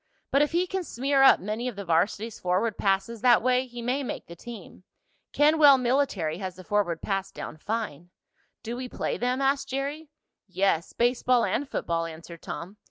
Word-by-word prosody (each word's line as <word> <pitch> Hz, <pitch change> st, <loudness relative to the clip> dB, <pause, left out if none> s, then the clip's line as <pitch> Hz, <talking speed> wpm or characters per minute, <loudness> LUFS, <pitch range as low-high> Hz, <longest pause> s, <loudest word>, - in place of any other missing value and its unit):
But 275 Hz, -, +4 dB
if 295 Hz, -, +2 dB
he 345 Hz, +2 st, +2 dB
can 380 Hz, 0 st, -3 dB
smear 275 Hz, -1 st, 0 dB
up 270 Hz, -, +7 dB
many 215 Hz, +5 st, -3 dB
of 245 Hz, -, -4 dB
the 200 Hz, 0 st, -6 dB
varsity's 200 Hz, +6 st, 0 dB
forward 190 Hz, +5 st, 0 dB
passes 200 Hz, +3 st, 0 dB
that 240 Hz, -3 st, +5 dB
way 255 Hz, +1 st, +2 dB
he 240 Hz, -1 st, -8 dB
may 255 Hz, +4 st, 0 dB
make 265 Hz, -, -5 dB
the 170 Hz, -, -11 dB
team. 205 Hz, -2 st, -11 dB, 0.5 s
Kenwell 295 Hz, -2 st, +6 dB
Military 240 Hz, -, 0 dB
has 185 Hz, -2 st, -5 dB
the 185 Hz, -, -11 dB
forward 180 Hz, -4 st, -1 dB
pass 195 Hz, -1 st, -2 dB
down 155 Hz, -, -7 dB
fine." 175 Hz, -4 st, -4 dB, 0.5 s
"Do 235 Hz, +2 st, -4 dB
we 250 Hz, 0 st, -5 dB
play -, -, -3 dB
them?" 250 Hz, +2 st, 0 dB
asked 275 Hz, +1 st, +1 dB
Jerry. 285 Hz, +3 st, -4 dB, 0.4 s
"Yes, 185 Hz, -3 st, 0 dB
baseball 245 Hz, 0 st, +2 dB
and 285 Hz, 0 st, -1 dB
football," 165 Hz, 0 st, -1 dB
answered 165 Hz, +1 st, -10 dB
Tom. 185 Hz, +5 st, -7 dB
230 Hz, 180 wpm, -27 LUFS, 185-265 Hz, 0.5 s, up